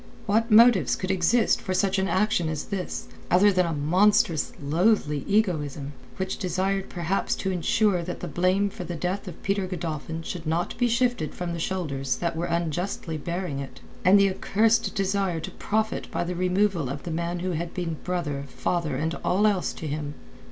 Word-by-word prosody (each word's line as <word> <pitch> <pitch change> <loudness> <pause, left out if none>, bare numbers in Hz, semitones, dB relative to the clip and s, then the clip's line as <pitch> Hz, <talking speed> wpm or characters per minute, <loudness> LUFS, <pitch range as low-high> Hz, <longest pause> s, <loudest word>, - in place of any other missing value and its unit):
What 225 +2 +2
motives 215 - +6
could 185 0 -2
exist 190 +6 +3
for 185 - -2
such 195 0 +2
an 190 - +1
action 185 -4 +1
as 155 -2 -3
this, 195 -3 -4 0.2
other 200 +3 +5
than 185 -2 +2
a - - -1
monstrous, 175 +3 +3
a 145 - -9
loathly 155 -2 +2
egoism 150 -9 0 0.2
which 190 -1 -3
desired 190 +2 -1
perhaps 175 +3 -1
to 190 - -2
ensure 185 +2 +2
that 175 +1 -5
the 180 - -5
blame 185 +5 +1
for 180 - -7
the 175 0 -5
death 180 +5 -3
of 175 - -9
Peter 195 -1 0
Godolphin 165 -2 -4
should 165 -1 -6
not 165 +2 -1
be 245 - +3
shifted 240 -8 0
from 175 -1 -3
the 170 - -4
shoulders 145 -8 -2
that 170 -1 -2
were 165 +2 -1
unjustly 170 0 -2
bearing 170 -3 -3
it, 135 -1 -8 0.2
and 195 +2 +7
the 200 -1 +4
accursed 220 +4 +1
desire 195 -3 0
to 190 +4 -6
profit 220 +4 -2
by - - -1
the 175 +1 -3
removal 180 -4 +1
of 140 +1 -5
the 170 - -5
man 170 +2 -2
who 185 +1 -1
had 170 0 -3
been 165 -3 -3
brother, 150 -6 -2
father 160 +1 -2
and 160 +5 -1
all 195 +4 +2
else 200 -4 +2
to - - -8
him? 145 -1 -4
180 Hz, 190 wpm, -26 LUFS, 160-195 Hz, 0.2 s, and